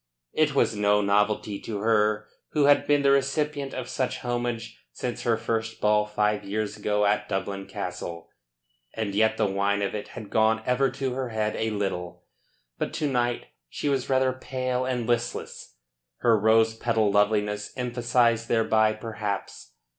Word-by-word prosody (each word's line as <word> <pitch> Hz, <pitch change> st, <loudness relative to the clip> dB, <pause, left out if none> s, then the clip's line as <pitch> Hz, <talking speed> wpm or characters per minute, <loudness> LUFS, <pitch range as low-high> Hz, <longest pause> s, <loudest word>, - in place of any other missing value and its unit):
It 150 Hz, -2 st, +2 dB
was 115 Hz, -, +2 dB
no 105 Hz, 0 st, +3 dB
novelty 105 Hz, 0 st, +1 dB
to 110 Hz, -, -5 dB
her 105 Hz, -1 st, +2 dB, 0.3 s
who 150 Hz, -, +3 dB
had 145 Hz, 0 st, +4 dB
been 145 Hz, -1 st, +3 dB
the 140 Hz, -, +5 dB
recipient 140 Hz, +1 st, 0 dB
of -, -, -4 dB
such 130 Hz, -, -2 dB
homage 120 Hz, -2 st, -3 dB
since 120 Hz, -3 st, -4 dB
her 115 Hz, -2 st, +1 dB
first 115 Hz, 0 st, -2 dB
ball 105 Hz, 0 st, +3 dB
five 105 Hz, 0 st, 0 dB
years 105 Hz, +1 st, -3 dB
ago 105 Hz, 0 st, 0 dB
at 105 Hz, +1 st, +1 dB
Dublin 95 Hz, 0 st, -3 dB
Castle, 90 Hz, -4 st, -6 dB, 0.7 s
and 110 Hz, -3 st, -2 dB
yet 110 Hz, +2 st, +2 dB
the 110 Hz, -, +2 dB
wine 100 Hz, +1 st, 0 dB
of 100 Hz, -, -2 dB
it 105 Hz, -, -4 dB
had 110 Hz, -3 st, -10 dB
gone 110 Hz, 0 st, +3 dB
ever 130 Hz, +2 st, +2 dB
to 130 Hz, 0 st, -3 dB
her 130 Hz, -1 st, -3 dB
head 110 Hz, -1 st, -1 dB
a 110 Hz, -, -1 dB
little. 90 Hz, -4 st, -3 dB, 0.6 s
But -, -, -2 dB
to 150 Hz, -, -1 dB
night 120 Hz, -3 st, 0 dB, 0.2 s
she 145 Hz, -, -2 dB
was 135 Hz, -3 st, -1 dB
rather 130 Hz, -1 st, +3 dB
pale 130 Hz, 0 st, -2 dB
and 125 Hz, -2 st, -1 dB
listless, 120 Hz, -, -3 dB, 0.5 s
her 115 Hz, -2 st, +5 dB
rose 110 Hz, +1 st, +4 dB
petal 110 Hz, -2 st, +1 dB
loveliness 105 Hz, 0 st, +1 dB
emphasised 120 Hz, -2 st, +1 dB
thereby 110 Hz, -1 st, +3 dB
perhaps. 105 Hz, -, -5 dB
110 Hz, 160 wpm, -26 LUFS, 105-125 Hz, 0.7 s, the